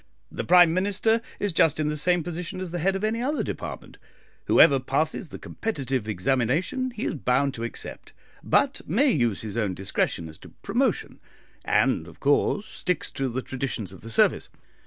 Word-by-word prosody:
The - - -4
Prime 175 -2 +6
Minister 205 +5 +1 0.2
is 205 -3 -1
just 160 -2 +3
in 155 - +1
the 150 - -1
same 175 +3 +1
position 175 +2 -5
as 185 -2 -5
the 175 - -3
head 190 +4 +1
of 195 - -4
any 220 +2 0
other 290 +4 0
department, - - -7 0.5
whoever 135 -1 +6
passes 155 +6 -1
the - - -8
competitive 135 - -3
examination 135 - 0
he 235 -3 -5
is - - -1
bound 135 -1 +1
to 115 - -6
accept, 115 - -6 0.3
but - - +1
may 255 - +3
use 120 - 0
his 110 +1 -3
own 100 -5 -1
discretion 90 -3 -1
as 80 -1 -12
to - - -13
promotion, - - -1 0.4
and, 80 - +2
of 85 - -14
course, 145 +8 +2
sticks 180 -5 -3
to 135 -1 -2
the 125 +2 -3
traditions 120 -8 -4
of 95 - -13
the 115 - -9
service. 115 - +2
150 Hz, 180 wpm, -25 LUFS, 125-190 Hz, 0.5 s, Prime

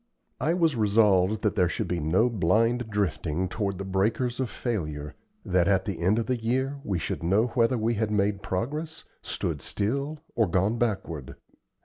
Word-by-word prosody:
I 160 +6 +1
was 165 -5 +2
resolved 105 -2 +3
that 105 - +1
there 90 -2 +3
should - - -2
be 90 - -1
no 85 +10 +3
blind 115 +3 +1
drifting 95 -4 -1
toward 100 0 -2
the 100 - -4
breakers 110 +6 0
of 130 -3 -1
failure 75 - -3 0.3
that 90 -1 +2
at 95 -2 +2
the 100 -6 -3
end 95 +6 +2
of 115 - 0
the 125 -2 -1
year 130 +4 0
we 95 - -1
should 80 - -3
know 100 +8 +2
whether 120 0 +2
we 115 +1 +1
had 110 -1 0
made 100 -1 +1
progress, 150 - -3 0.2
stood 75 -5 -3
still, 140 - -2 0.2
or 110 -3 +2
gone 95 +7 +1
backward. 80 - -2
105 Hz, 175 wpm, -27 LUFS, 90-120 Hz, 0.3 s, resolved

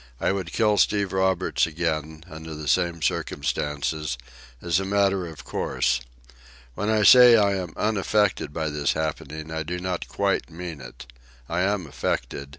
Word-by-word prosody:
I - - +1
would 95 -4 -3
kill 105 -2 +2
Steve 100 -2 +2
Roberts 95 -2 +1
again, 80 -1 -3
under 80 -1 -8
the 75 0 -7
same 85 +1 +1
circumstances, 75 +1 -2 0.4
as 85 +4 +1
a - - -2
matter 100 -2 +1
of 80 -3 -10
course. 65 0 -1 0.7
When 105 - -2
I 110 -1 +2
say 125 +2 +9
I 100 -3 +3
am 90 -4 -4
unaffected 105 -5 +1
by 80 0 -2
this 75 -1 0
happening 80 0 -4
I 80 0 -2
do 85 +3 -4
not 90 -1 -3
quite - - -1
mean 85 -3 -7
it. - - -11 0.4
I 85 +2 -1
am 100 -1 0
affected. 70 -1 -3
85 Hz, 155 wpm, -25 LUFS, 75-95 Hz, 0.7 s, say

